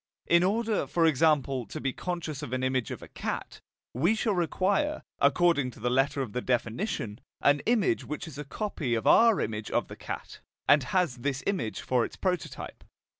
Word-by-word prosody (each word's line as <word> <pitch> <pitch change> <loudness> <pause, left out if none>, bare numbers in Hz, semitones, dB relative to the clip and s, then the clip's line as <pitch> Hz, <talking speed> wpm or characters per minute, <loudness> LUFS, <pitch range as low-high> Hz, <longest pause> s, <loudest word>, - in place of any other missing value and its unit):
In 170 +1 +4
order, 220 +3 +1
for 170 -1 +2
example, 145 -5 +2
to 155 - -6
be 135 -3 -2
conscious 165 -5 -4
of 130 -4 -6
an 130 0 -1
image 130 -2 0
of - - -6
a - - -10
cat, - - -5 0.3
we 170 - +2
shall 220 -1 0
require, 195 - 0 0.2
according 145 -1 +3
to 120 - -13
the 120 +2 0
letter 135 +2 +2
of 110 -6 -8
the 125 - -1
definition, 120 - -2 0.2
an 145 0 +4
image 245 - +2
which 150 +3 -5
is 145 -3 -9
a - - -3
copy 145 - -2
of 115 - -2
our 230 -2 +6
image 105 -1 -3
of - - 0
the - - -8
cat, - - -7 0.3
and 145 -3 +5
has 155 -1 +1
this 135 +2 -2
image 150 - -1
for 125 -2 +1
its - - -5
prototype. 180 -4 -3
150 Hz, 190 wpm, -28 LUFS, 125-180 Hz, 0.3 s, our